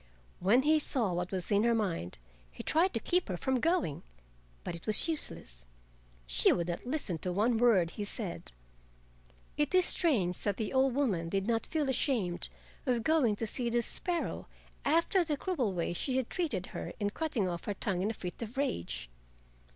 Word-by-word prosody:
When 230 +8 +4
he 310 +1 +4
saw 235 -10 0
what 175 +1 -2
was 185 0 -3
in 205 0 +4
her 235 0 +3
mind 175 - -2 0.3
he - - -9
tried 345 +4 +3
to - - +1
keep 360 - 0
her 180 - -2
from 265 +5 0
going, 330 - 0 0.6
but - - -4
it 170 - -10
was 215 +8 +3
useless. 80 - -1 0.6
She - - +4
would 170 0 0
not 175 +7 -4
listen 250 - -1
to 180 - -1
one 220 +5 +2
word 200 -9 +4
he 210 - -5
said. 205 -3 -3 1.1
It 295 +3 +1
is 365 -1 +5
strange 205 - +2
that 205 -2 -1
the 220 +2 -3
old 265 -1 +3
woman 195 -13 0
did 195 +1 -1
not 225 0 0
feel 305 -3 -1
ashamed 235 - +1 0.4
of 240 -3 +1
going 275 -7 +3
to 225 - -3
see 235 +2 +1
the 235 0 +1
sparrow 345 +8 -2 0.4
after 335 +4 +3
the 305 -3 -2
cruel 275 - -1
way 175 -1 -2
she 260 +8 -1
had 260 -3 -2
treated 270 - -1
her - - -5
in 205 -1 0
cutting 250 - -1
off 170 -2 -4
her 205 - -2
tongue 190 -2 -1
in 200 - 0
a - - -2
fit 180 +3 -7
of 230 +3 -6
rage. 85 - -2
225 Hz, 190 wpm, -31 LUFS, 180-280 Hz, 1.1 s, is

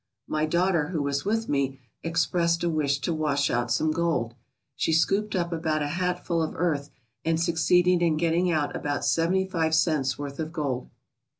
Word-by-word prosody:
My 155 0 0
daughter, 170 -1 +2
who 160 -3 -2
was 140 +2 -1
with 225 +2 0
me, 135 -2 -1 0.2
expressed 170 0 +1
a 170 - +1
wish 145 -3 +1
to 170 - -1
wash 145 -3 0
out 120 0 0
some 155 +6 +2
gold. 155 -9 0 0.4
She 160 - 0
scooped 195 +6 +1
up 170 -1 -1
about 160 -2 0
a 145 - -2
hatful 175 0 -1
of 160 - -2
earth 150 -5 -1 0.3
and 165 0 +1
succeeded 175 +2 +3
in 165 -3 +2
getting 170 +2 +2
out 155 -3 0
about 145 -1 -2
seventy 180 +3 +2
five 165 -4 0
cents' 150 -5 +1
worth 140 -1 -6
of 160 0 -3
gold. 140 -6 -3
160 Hz, 180 wpm, -26 LUFS, 145-170 Hz, 0.4 s, succeeded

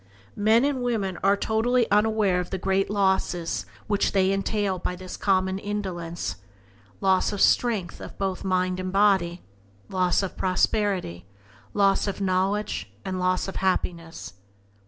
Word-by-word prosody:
Men 220 +5 +4
and 280 -3 0
women 210 -7 -1
are 200 +1 +4
totally 230 +4 +1
unaware 210 -3 +3
of 180 - -4
the 190 - -3
great 195 +1 0
losses 190 -4 0 0.2
which 205 -1 0
they 190 -1 +3
entail 195 -1 -1
by 180 - -3
this 185 0 -8
common 190 -1 +1
indulgence: 175 - -4 0.6
loss 190 -1 +3
of 205 - -4
strength 215 -8 +2 0.2
both 195 -1 -2
of - - -10
mind 185 -1 0
and 185 0 -3
body, 190 -3 +2 0.5
loss 185 0 +1
of 190 - -4
prosperity, 185 - 0 0.5
loss 200 0 +3
of 200 - -3
knowledge, 195 +2 -1
and 185 -1 -3
loss 185 +1 +1
of 195 - -5
happiness. 170 - -2
190 Hz, 140 wpm, -25 LUFS, 185-205 Hz, 0.6 s, Men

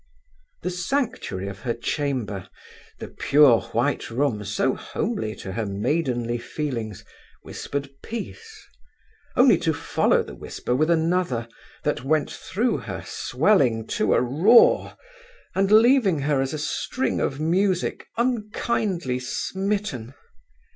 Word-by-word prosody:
The 180 - -1
sanctuary 180 - -2
of 100 0 -7
her 115 +1 -2
chamber, 120 - -3 0.5
the - - -7
pure 140 -5 +5
white - - 0
room 120 -4 0
so 105 +6 0
homely 205 - -3
to 95 - -7
her 110 +2 -3
maidenly 120 +2 -1
feelings, 115 -8 -4 0.4
whispered 140 0 -5
peace, 430 - -8 0.7
only 250 0 +6
to 160 -2 0
follow - - +2
the - - -10
whisper 125 - -4
with 155 +5 +2
another 165 -8 +1 0.4
that - - -1
went 150 +2 +1
through 230 +6 -1
her - - -6
swelling 125 - +2
to - - +2
a - - +3
roar, 170 - +5 0.6
and 195 +1 +1
leaving 220 - +5
her 145 -1 +1
as 135 - -1
a 155 - -3
suing 155 - -2
of 135 - -1
music 180 +3 0
unkindly 215 - -1
smitten. 190 - -3
150 Hz, 120 wpm, -24 LUFS, 120-200 Hz, 0.7 s, only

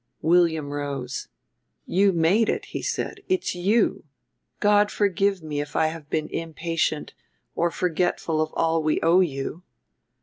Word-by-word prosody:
William 160 -4 +3
rose. 140 -3 -4 0.6
"You 195 +2 +3
made 185 +6 +3
it," - - -1
he - - -5
said; 395 - -3
"it's 370 -1 0
you. 200 +6 +1 0.6
God 205 0 +4
forgive 200 -2 +1
me 150 -2 -3
if 145 0 -8
I 160 - +3
have 155 -3 -11
been 155 0 -1
impatient 165 -1 -2 0.4
or 170 - +1
forgetful 170 -2 0
of 155 0 -1
all 165 0 +2
we 155 0 +1
owe 170 +3 +5
you." 155 -1 -1
165 Hz, 140 wpm, -24 LUFS, 155-190 Hz, 0.6 s, owe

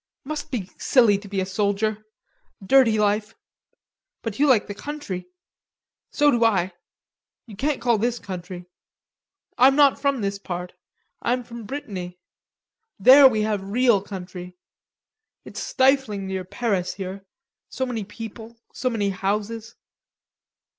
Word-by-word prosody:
Must 305 +2 -5
be 215 -9 -4
silly 225 -6 +4
to 200 - -12
be 195 -1 -3
a - - -1
soldier. 205 +2 -1 0.6
Dirty 240 -1 +5
life.... 210 +1 0 0.9
But 225 -1 -5
you 295 - +4
like 245 -6 +4
the 205 - -6
country. 200 -9 -6 0.8
So 295 -1 +3
do 235 -3 +2
I. 190 -5 +2 0.7
You 220 -4 -11
can't 280 +6 -1
call 235 -3 +2
this 240 +2 0
country. 180 -3 -7 0.9
I'm 265 +2 +6
not 285 -2 +4
from 280 -4 +1
this 200 0 -2
part; 180 -2 -6 0.5
I'm 250 +1 0
from 235 -1 -9
Brittany. 200 -9 -6 0.8
There 265 +7 +9
we 220 -4 +1
have 210 -2 -1
real 215 +1 +2
country. 180 -2 -8 0.9
It's - - -7
stifling 260 -7 +1
near 190 -1 -4
Paris 190 -3 -2
here, 190 0 -6 0.5
so 260 - -2
many 235 -4 -3
people, 225 +2 -9 0.2
so 255 - -1
many 205 -4 -1
houses." 210 +4 -3
215 Hz, 135 wpm, -23 LUFS, 195-250 Hz, 0.9 s, There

